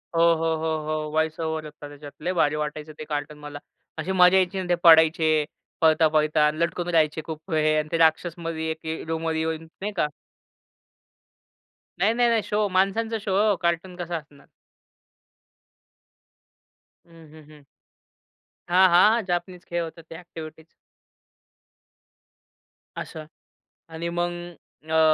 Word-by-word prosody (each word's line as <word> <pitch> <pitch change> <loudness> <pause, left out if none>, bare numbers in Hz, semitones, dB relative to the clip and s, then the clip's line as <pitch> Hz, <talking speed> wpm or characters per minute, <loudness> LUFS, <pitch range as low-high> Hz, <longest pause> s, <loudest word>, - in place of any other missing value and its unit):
हो, 165 - +3
हो, 165 0 0
हो, 160 0 -1
हो. 155 -1 -2
वॉईस 160 +1 -1
ओव्हर 160 -1 -3
होतं 150 -1 -10
त्याच्यात. 145 0 -11
लई 180 - 0
भारी 150 -4 +2
वाटायचं 150 0 -5
ते - - -5
कार्टून 150 0 -4
मला. 145 -1 -8 0.4
अशी 160 +4 -3
मजा 180 0 +5
यायची 190 +1 +1
ना, 180 - -6
ते 175 - +4
पडायचे 160 -2 +5 0.4
पळता-पळता 155 -1 +3
अन 150 - -1
लटकून 170 +1 -1
राहायचे 160 -2 +2
खूप 160 +3 -8
वेळे 155 -1 +2
आणि 155 - -3
ते - - +1
राक्षसमधी 165 0 0
एक 160 - -3
हे 160 0 -4
रूममध्ये 160 0 -2
येऊन 160 0 -3 0.2
नाही 210 - -2
का? 150 - +2 1.9
नाही, 205 +4 +3
नाही, 240 0 +3
नाही. 230 -1 +2
शो 210 0 0
माणसांचा 195 +5 +1
शो 200 - -4 0.2
हो. 205 - +3
कार्टून 170 +1 -1
कसा 175 -1 -5
असणार? 145 -2 -15 2.6
हं, 165 -2 -17
हं, 155 -1 -14
हं. 150 -1 -17 1.1
हां, 185 +2 +6
हां. 215 +6 +5
जापनीज 180 0 -3
खेळ 170 0 -2
होता 165 0 -9
ते 165 - -9
एक्टिविटीज. 160 -2 -10 2.4
असं. 155 -2 -8 0.6
आणि 165 +1 -5
मग, 175 0 0 0.6
अ, 160 - +3
160 Hz, 140 wpm, -24 LUFS, 155-175 Hz, 2.6 s, हां